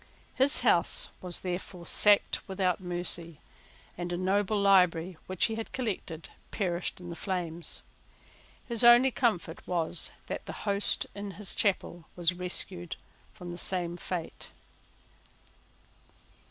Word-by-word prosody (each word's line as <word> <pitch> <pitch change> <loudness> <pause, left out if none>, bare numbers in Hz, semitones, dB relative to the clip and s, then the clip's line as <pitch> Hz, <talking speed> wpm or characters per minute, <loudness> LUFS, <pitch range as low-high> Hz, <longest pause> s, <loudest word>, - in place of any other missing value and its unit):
His 270 +2 +3
house 195 -8 +3
was 180 -2 -1
therefore 180 -1 -5
sacked 205 +3 +4
without 190 -2 0
mercy; 175 -3 +2 0.6
and 175 0 -5
a 175 - -1
noble 200 +3 +1
library, 185 -3 +3
which 185 -1 +2
he 225 - -1
had 225 0 -5
collected, 190 -9 -4 0.2
perished 180 -4 -2
in 175 -1 -9
the - - -6
flames. 175 -3 -4 0.8
His 235 -1 +2
only 240 +2 +7
comfort 195 -10 0
was 175 -1 -1 0.2
that - - -6
the - - -5
host 200 0 +2
in 200 0 -6
his 210 -2 0
chapel 175 -4 0
was 175 0 +2
rescued 180 -1 -1 0.4
from 180 -4 -9
the 175 - -6
same 175 -2 -1
fate. 175 -1 -6
180 Hz, 125 wpm, -29 LUFS, 175-200 Hz, 0.8 s, only